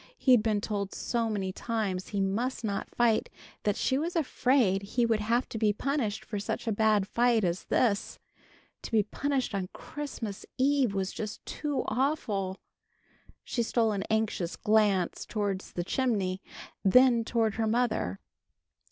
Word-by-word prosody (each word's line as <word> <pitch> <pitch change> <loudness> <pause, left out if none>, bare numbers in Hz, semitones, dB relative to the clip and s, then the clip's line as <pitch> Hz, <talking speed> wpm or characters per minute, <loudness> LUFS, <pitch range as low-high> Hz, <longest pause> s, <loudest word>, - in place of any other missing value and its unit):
He'd 250 -4 +5
been 210 -2 +1
told 200 -2 -3
so 230 -2 -1
many 195 -3 -2
times 200 -3 -2
he 200 -2 -2
must 230 +7 -1
not 200 -2 -2
fight 235 -2 +2 0.3
that 205 -1 +1
she 265 - +1
was 335 +4 -2
afraid 255 - +2
he 225 +4 0
would 225 -2 +2
have 230 +4 +1
to 225 - -5
be 210 -2 +3
punished 235 -3 -2
for 210 - -4
such 200 - -3
a 225 - 0
bad 210 -2 +3
fight 235 -1 +3
as 175 0 -1
this. 205 -5 +1 0.6
To - - -8
be 220 -2 +4
punished 270 +4 -1
on 190 -2 -2
Christmas 240 -9 -6
eve 265 -5 +2
was 195 0 -1
just 215 -1 -6
too 295 -2 -2
awful! 215 -7 -1 0.9
She 240 - -2
stole 225 0 +2
an 200 -2 -1
anxious 220 -5 0
glance 210 -4 +2
towards 200 -3 -3
the 175 - -2
chimney, 195 -4 0 0.4
then 240 +3 +6
toward 225 -2 +1
her 225 -1 +1
mother. 220 - 0
220 Hz, 155 wpm, -29 LUFS, 200-245 Hz, 0.9 s, then